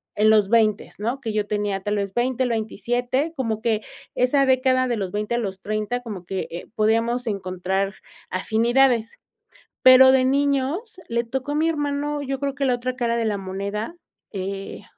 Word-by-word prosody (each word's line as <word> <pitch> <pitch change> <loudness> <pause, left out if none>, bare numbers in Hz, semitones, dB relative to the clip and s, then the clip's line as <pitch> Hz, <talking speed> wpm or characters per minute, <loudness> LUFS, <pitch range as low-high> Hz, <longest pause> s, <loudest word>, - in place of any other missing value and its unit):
en 215 +1 +4
los 210 -2 +4
veintes, 215 -3 +1
¿no? 240 +6 -2
Que 225 -5 -4
yo 210 -1 -1
tenía 205 -2 -1
tal 205 +2 -2
vez 200 -1 -2
20, 255 +1 0
el 245 - 0
27, 245 - -1
como 225 -5 -2
que 220 -2 +1 0.3
esa 275 +2 +3
década 255 0 +3
de 240 -2 -1
los 190 -3 -3
20 210 +2 -2
a 240 - +1
los 195 -4 -4
30, 215 +3 -2
como 205 -7 -7
que, 190 0 -3
eh, 170 - -7
podíamos 230 +3 +1
encontrar 190 -1 -2 0.3
afinidades. 230 +4 +2 0.7
Pero 260 0 +9
de 260 -1 +4
niños 285 - 0
le 235 0 0
tocó 265 +4 -3
a 290 - -1
mi 315 +2 +2
hermano, 290 -1 -1
yo 270 -1 -3
creo 280 0 -2
que 280 - -3
la 255 -2 +3
otra 250 +1 -3
cara 235 -2 0
de 230 - 0
la 210 -2 0
moneda, 200 - -4 0.4
eh, 195 0 -5
235 Hz, 185 wpm, -23 LUFS, 205-260 Hz, 0.7 s, Pero